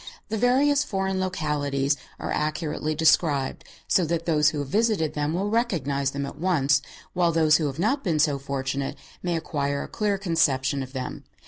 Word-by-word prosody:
The 220 - -1
various 275 +4 +3
foreign 190 -1 -2
localities 145 -6 0 0.2
are - - -4
accurately 155 0 -2
described, 150 -3 +2 0.2
so 185 - +3
that 165 +1 -2
those 150 -3 +4
who 150 - -5
have 145 -1 -3
visited 205 -3 +1
them 150 +2 -1
will 200 +3 -1
recognize 145 - 0
them 140 0 -3
at 140 - -9
once, 145 -6 +2 0.3
while 175 -2 +2
those 155 -2 +4
who 155 - -1
have 135 -1 -5
not 225 - +1
been 170 -5 +1
so 150 -2 +2
fortunate 135 0 -3 0.3
may 175 -1 -1
acquire 140 -3 -2
a - - -7
clear 210 -2 -1
conception 145 -7 +1
of 130 0 -7
them. 130 -1 -5
155 Hz, 180 wpm, -25 LUFS, 140-185 Hz, 0.3 s, those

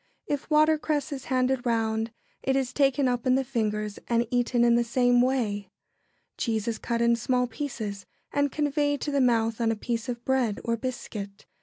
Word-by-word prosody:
If 290 +1 -3
watercress 305 -1 +2
is 270 -2 -5
handed 255 -1 +1
round, 225 -2 0 0.3
it 265 - +1
is 260 -2 0
taken 275 -1 +3
up 245 -1 -1
in 255 - +5
the 270 - +2
fingers 215 -5 -2
and 235 0 +2
eaten 245 -1 +2
in 240 0 +5
the 240 0 +4
same 245 +1 +3
way. 220 -7 0 0.7
Cheese 220 -2 -1
is 230 -1 -2
cut 235 -1 -1
in 235 0 +4
small 250 +2 +1
pieces 225 -6 -5 0.3
and 285 -1 +1
conveyed 290 -1 0
to 295 - -2
the 280 -1 +2
mouth 230 -2 +2
on 225 -1 +2
a - - 0
piece 230 +2 -3
of 240 -1 -5
bread 255 -6 +1
or 230 0 0
biscuit. 215 -5 -6
245 Hz, 185 wpm, -27 LUFS, 225-270 Hz, 0.7 s, in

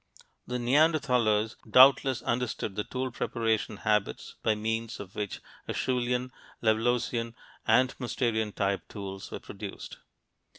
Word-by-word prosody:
The 125 - -2
Neanderthalers 125 -5 +2
doubtless 130 +1 +6
understood 120 -4 -2
the 105 - -1
tool 130 +2 -3
preparation 115 -3 -1
habits 105 -1 0
by 110 - +2
means 115 +2 -3
of 95 -1 -9
which 105 -2 -4 0.3
Acheulean, 125 0 -1 0.3
Levalloisian 115 +1 +1 0.3
and 125 +4 +4
Mousterian 115 -4 -1
type 100 -1 -1
tools 95 -1 -7
were - - -6
produced. - - -8
115 Hz, 115 wpm, -29 LUFS, 105-125 Hz, 0.3 s, doubtless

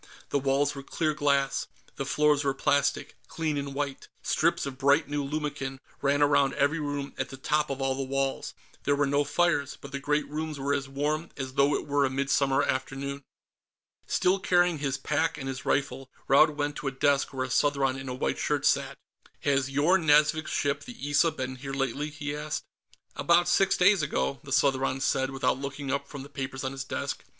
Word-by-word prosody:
The 140 - +1
walls 140 +1 +1
were 140 - -7
clear 155 +3 -1
glass. 140 -2 +1 0.3
The - - -3
floors 150 -1 +3
were 135 -1 0
plastic, 145 0 +1
clean 160 -2 -2
and 140 -1 -4
white. 140 -1 -3 0.2
Strips - - +1
of 135 -1 -6
bright 140 +2 +3
new 145 0 -2
lumicon 140 -2 -3 0.2
ran 145 +1 +3
around 140 -1 +3
every 145 +3 +1
room 145 -1 -3
at - - -2
the 135 - -9
tops 150 +3 0
of 135 0 -3
all 135 0 +1
the 135 - -3
walls. 135 0 -2 0.3
There 145 - +1
were 145 0 +2
no 140 +1 +2
fires, 145 -2 +1
but 140 - -10
the 140 - -3
great 150 +1 0
rooms 155 0 -4
were 140 +1 0
as 140 -1 -2
warm 150 +4 -1
as 130 -2 -5
though 140 +1 +3
it - - -3
were 145 -1 +1
a 135 - +2
midsummer 135 0 +1
afternoon. 135 +2 -3 0.9
Still 185 +2 +2
carrying 175 -3 +2
his 140 -2 -1
pack 160 +2 0
and 135 - -6
his 135 -1 -5
rifle, 135 -1 -1 0.2
Raud 150 +2 +5
went 145 0 -2
to 145 - -4
a - - 0
desk 135 +1 +1
where 130 -2 -2
a 130 - -7
Southron 140 -1 +2
in 135 0 -6
a 125 - -3
white - - -1
shirt - - 0
sat. - - +1 0.4
"Has 135 -2 +1
Yorn 160 +5 +2
Nazvik's 150 +1 +4
ship, 140 -1 -1
the 245 -1 -10
Issa, 165 +4 +4
been 130 -4 -5
here 135 +1 -6
lately?" 140 +2 -1
he 145 -1 -5
asked. 155 +1 -4 0.5
"About 170 0 +3
six 195 -1 +3
days 190 0 +5
ago," 140 -2 -1
the 140 - -10
Southron 135 -1 +2
said, 135 0 +1
without 135 -1 0
looking 140 0 -4
up 140 0 -2
from 140 -2 -8
the - - -10
papers 135 -2 -5
on 130 - -2
his 135 -1 -5
desk. - - -4
140 Hz, 205 wpm, -28 LUFS, 135-150 Hz, 0.9 s, Raud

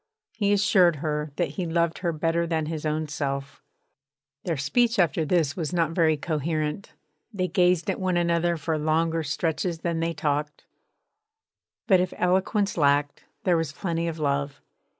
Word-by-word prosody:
He 205 -2 0
assured 195 -4 +4
her 150 0 -3
that 170 -1 0
he 170 +5 -4
loved 170 0 0
her 175 -2 0
better 165 +2 0
than 160 -2 -1
his 155 0 -3
own 155 +1 -1
self. 140 -2 -4 0.8
Their 165 -4 -1
speech 230 - +1
after 165 -3 +2
this 155 -3 +1
was 165 -4 -3
not 165 -2 +1
very 160 -2 +2
coherent; 155 +2 -2 0.4
they 185 -4 -1
gazed 180 0 +2
at 195 - -1
one 185 -2 0
another 170 0 +1
for 155 +1 -2
longer 160 +2 +1
stretches 160 +2 -2
than 170 -1 -1
they 165 +1 -1
talked; 150 0 -2 1.2
but 190 -5 +5
if 180 0 -1
eloquence 190 +3 +1
lacked, 145 -1 +1 0.2
there 180 -2 +3
was 165 -3 -2
plenty 170 -1 -2
of 165 -1 -3
love. 140 -1 -1
165 Hz, 160 wpm, -25 LUFS, 150-175 Hz, 1.2 s, but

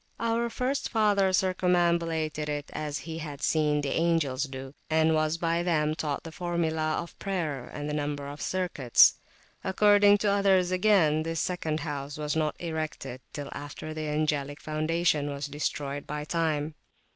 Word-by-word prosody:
Our 230 +1 0
First 255 +4 -1
Father 205 -4 +3
circumambulated 170 -4 +1
it 145 0 -4
as 150 -1 -3
he 165 -1 -5
had 145 -3 -7
seen 150 -2 +2
the 140 -1 -2
angels 160 -5 +1
do, 135 0 -8 0.2
and 160 0 +3
was 155 +1 +1
by 170 0 0
them 155 -3 +1
taught 150 -2 -3
the 165 - -8
formula 160 -2 -1
of 170 - -8
prayer 160 -10 -2
and 145 0 -5
the 150 - -3
number 145 -1 -2
of 145 +1 -8
circuits. 175 -10 +4 0.4
According 205 +1 +5
to 205 0 +1
others, 190 -3 +3
again, 180 -5 +4
this 165 0 -2
second 160 -4 -1
house 145 -2 -4
was 150 0 -2
not 155 -1 0
erected 155 -6 -4
till 145 -1 -6
after 145 +2 -7
the 155 -1 -4
Angelic 150 -1 -1
Foundation 155 -1 0
was 140 -1 -4
destroyed 145 -1 -3
by 150 0 -4
time. 155 -2 -1
155 Hz, 155 wpm, -28 LUFS, 150-175 Hz, 0.4 s, According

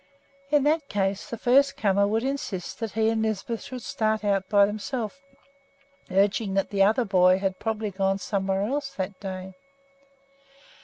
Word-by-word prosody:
In 290 -1 +3
that 300 0 +1
case 195 -1 -1
the 235 - -5
first 275 +5 +3
comer 200 -1 +2
would 220 +3 0
insist 260 -9 -4
that 225 -3 -4
he 220 +1 +2
and 225 -1 0
Lisbeth 220 +1 -2
should 255 -2 -8
start 220 -1 -1
out 200 -2 0
by 205 -1 +6
themselves, 215 +4 -4 0.9
urging 195 +1 +1
that 195 +1 0
the 200 -1 +1
other 220 +5 +4
boy 185 -2 +4
had 190 -1 -2
probably 220 -2 -2
gone 195 0 0
somewhere 195 0 -1
else 280 +6 -2
that 190 0 -4
day. 190 -1 -6
205 Hz, 160 wpm, -26 LUFS, 195-225 Hz, 0.9 s, by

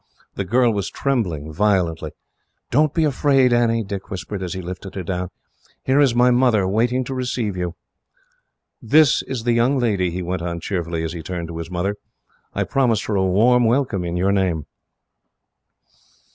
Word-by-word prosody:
The 100 - -3
girl 120 +4 +3
was 100 -2 -2
trembling 85 - -2
violently. 85 -5 0 0.6
"Don't 150 +3 +3
be 165 - +1
afraid, 135 -3 +3
Annie," 115 -1 +2
Dick 100 -1 -6
whispered, 95 0 -5
as 90 -1 -4
he 95 - -4
lifted 90 +2 -7
her 95 - -4
down. 90 0 -3 0.5
"Here 135 +2 +2
is 135 -5 +4
my 125 +1 +5
mother, 120 -6 +3
waiting 120 +6 +1
to 135 - -5
receive 125 -5 -2
you. 90 -1 -3 1.1
"This 155 -4 +4
is 125 -4 -5
the 120 0 +2
young 120 +4 +2
lady," 100 -8 +1
he 90 +2 -4
went 90 0 -3
on 85 0 -3
cheerfully, 85 -2 -3
as 80 0 -3
he 85 - -6
turned 85 0 -5
to 85 - -6
his 85 0 -6
mother. 95 +3 -2 0.5
"I - - -1
promised 120 -6 +1
her 105 - -2
a 95 - +2
warm 115 +6 +4
welcome, 115 -5 +1
in 85 0 -3
your 95 +2 +2
name." 90 -6 0
100 Hz, 175 wpm, -21 LUFS, 90-125 Hz, 1.1 s, my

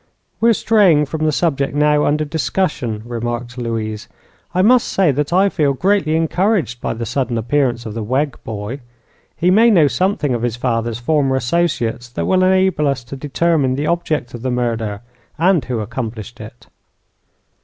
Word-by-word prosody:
"We 230 - +4
are - - +6
straying 195 -10 +3
from 155 +2 -3
the 155 - +2
subject 140 -3 0
now 150 0 +3
under 150 +1 +1
discussion," 145 - -2
remarked 120 0 -4
Louise. 110 -3 -4 0.4
"I 185 +1 +1
must 245 +3 +4
say 185 -6 +2
that 145 +3 -2
I 190 +3 +4
feel 150 -7 +1
greatly 180 +1 +1
encouraged 165 - 0
by - - -2
the 115 +1 -4
sudden 120 +1 -2
appearance 120 0 0
of 110 - -5
the 115 - -4
Wegg 130 +6 -1
boy. 110 +4 -5 0.6
He 175 +2 +2
may 225 +5 +5
know 170 -9 +5
something 180 -4 0
of 120 - -2
his 120 -2 -1
father's 115 -2 -1
former 135 +1 +1
associates 125 -4 -1
that 120 - -3
will 185 -1 +2
enable 185 -5 +2
us 135 -3 -1
to 120 +3 -8
determine 145 -1 0
the 145 +2 -2
object 155 -6 -1
of 120 - -7
the 130 - -2
murder 115 -4 -2 0.4
and 170 -2 +3
who 120 -3 -2
accomplished 115 0 -6
it." 110 0 -12
140 Hz, 175 wpm, -18 LUFS, 120-165 Hz, 0.6 s, are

